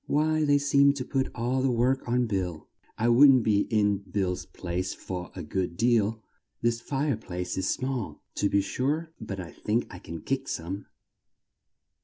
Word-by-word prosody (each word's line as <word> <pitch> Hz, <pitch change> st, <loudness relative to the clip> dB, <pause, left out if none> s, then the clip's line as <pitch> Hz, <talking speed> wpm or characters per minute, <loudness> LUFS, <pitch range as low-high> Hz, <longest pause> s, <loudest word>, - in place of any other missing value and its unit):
"Why, 155 Hz, +1 st, +2 dB
they 145 Hz, -1 st, +5 dB
seem 140 Hz, 0 st, +4 dB
to 130 Hz, -3 st, -4 dB
put 135 Hz, -1 st, 0 dB
all 125 Hz, +2 st, 0 dB
the 135 Hz, -, +2 dB
work 125 Hz, +2 st, +1 dB
on 125 Hz, +1 st, +2 dB
Bill. 90 Hz, -7 st, -3 dB, 0.3 s
I 115 Hz, -, +1 dB
wouldn't 130 Hz, +1 st, +7 dB
be 105 Hz, -2 st, +2 dB
in 105 Hz, -2 st, +2 dB
Bill's 95 Hz, -2 st, -2 dB
place 90 Hz, +1 st, -3 dB
for 90 Hz, -2 st, -6 dB
a 90 Hz, -, -5 dB
good 90 Hz, +2 st, -2 dB
deal; 115 Hz, -2 st, +2 dB, 0.4 s
this 115 Hz, 0 st, 0 dB
fire 140 Hz, +1 st, 0 dB
place 90 Hz, -4 st, -4 dB
is 95 Hz, 0 st, -1 dB
small, 130 Hz, -4 st, -3 dB
to 100 Hz, -, +1 dB
be 100 Hz, -, +3 dB
sure, 150 Hz, +10 st, -1 dB
but 100 Hz, -3 st, -5 dB
I 85 Hz, -2 st, -6 dB
think 115 Hz, +3 st, -1 dB
I 90 Hz, -, -8 dB
can 85 Hz, -2 st, -8 dB
kick 135 Hz, 0 st, -2 dB
some." 95 Hz, +4 st, -4 dB
115 Hz, 175 wpm, -28 LUFS, 95-135 Hz, 0.4 s, wouldn't